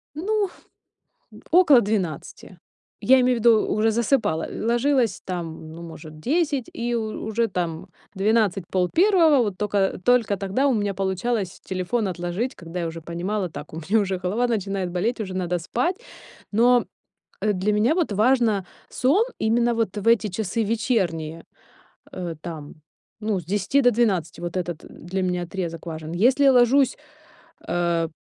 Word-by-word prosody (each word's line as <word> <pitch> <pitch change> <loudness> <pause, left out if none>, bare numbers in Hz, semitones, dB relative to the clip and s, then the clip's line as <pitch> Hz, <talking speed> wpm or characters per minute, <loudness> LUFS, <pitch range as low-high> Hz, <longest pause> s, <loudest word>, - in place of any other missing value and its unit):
Ну, 405 +4 0 1.0
около 320 -8 +6
12. 185 -4 -4 0.4
Я 255 +5 +5
имею 250 0 +3
в - - -2
виду, 225 -1 +4
уже 220 +1 +1
засыпала. 220 - +1
Ложилось 235 -1 +1
там, 165 -3 -6
ну, 165 +1 -9
может, 160 -2 -10
10, 280 - 0
и 240 +1 -2
у 220 -2 -3
уже 225 +1 +1
там 175 -2 -4 0.3
12:00-12:30. 220 - +3
Вот 205 -4 -3
тока 205 -2 0
только 235 -5 +3
тогда 200 +8 0
у 265 - +3
меня 205 -2 -1
получалось 195 +1 -2
телефон 190 +4 -2
отложить, 180 +8 -3
когда 170 +1 -7
я 170 - -2
уже 165 0 -6
понимала: 180 +4 -3
"Так, 150 -1 -9
у - - -8
меня 185 +7 +1
уже 190 -2 -1
голова 195 +7 0
начинает 195 -4 -2
болеть, 215 +7 -1
уже 190 -3 -4
надо 180 -1 -1
спать". 250 - -1 0.6
Но, 240 +3 +4 0.5
э, 210 0 +1
для 195 +2 0
меня 215 +9 +3
вот 335 - 0
важно 220 -2 +2 0.2
сон 295 - +2
именно 235 +2 +2
вот 225 -1 -1
в 205 +1 -5
эти 225 -2 +4
часы 220 +3 -2
вечерние, 180 -8 -1 0.7
э, 175 -3 -5
там, 155 -3 -8 0.4
ну, 210 -3 -1
с 170 - -14
10 205 - +1
до 245 - +5
12, 200 -9 0
вот 175 +1 -5
этот 175 -2 -4
для 190 +3 -5
меня 180 -1 -1
отрезок 170 -2 -5
важен. 160 -1 -6
Если 250 +10 +3
я 270 - +7
ложусь, 255 +2 +4 0.7
э, 170 -1 0
205 Hz, 155 wpm, -23 LUFS, 175-240 Hz, 1.0 s, я